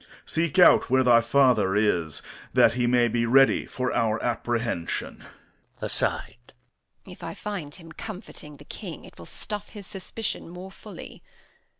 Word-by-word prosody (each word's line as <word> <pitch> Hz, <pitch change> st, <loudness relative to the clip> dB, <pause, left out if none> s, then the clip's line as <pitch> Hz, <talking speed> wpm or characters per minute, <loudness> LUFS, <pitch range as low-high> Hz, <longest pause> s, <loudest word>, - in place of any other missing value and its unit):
Seek 165 Hz, -1 st, 0 dB
out 180 Hz, -, +6 dB
where 130 Hz, +1 st, +4 dB
thy 120 Hz, -2 st, +6 dB
father 115 Hz, -6 st, +3 dB
is, 90 Hz, -7 st, +1 dB, 0.3 s
that 115 Hz, -, +5 dB
he 120 Hz, 0 st, 0 dB
may 120 Hz, -1 st, +4 dB
be 115 Hz, 0 st, 0 dB
ready 135 Hz, +3 st, +4 dB
for 125 Hz, 0 st, -2 dB
our 115 Hz, -1 st, +1 dB
apprehension. 120 Hz, -6 st, -2 dB, 0.6 s
Edm. -, -, -10 dB
[aside] 120 Hz, +1 st, -1 dB, 0.5 s
If -, -, -12 dB
I -, -, -5 dB
find 185 Hz, -8 st, -6 dB
him 165 Hz, -3 st, -13 dB
comforting 170 Hz, -6 st, -9 dB
the -, -, -15 dB
King, -, -, -8 dB
it -, -, -16 dB
will 85 Hz, -, -11 dB
stuff 210 Hz, -1 st, -7 dB
his 205 Hz, -3 st, -10 dB
suspicion 195 Hz, +1 st, -5 dB
more 180 Hz, +2 st, -9 dB
fully. -, -, -11 dB
125 Hz, 155 wpm, -26 LUFS, 115-175 Hz, 0.6 s, out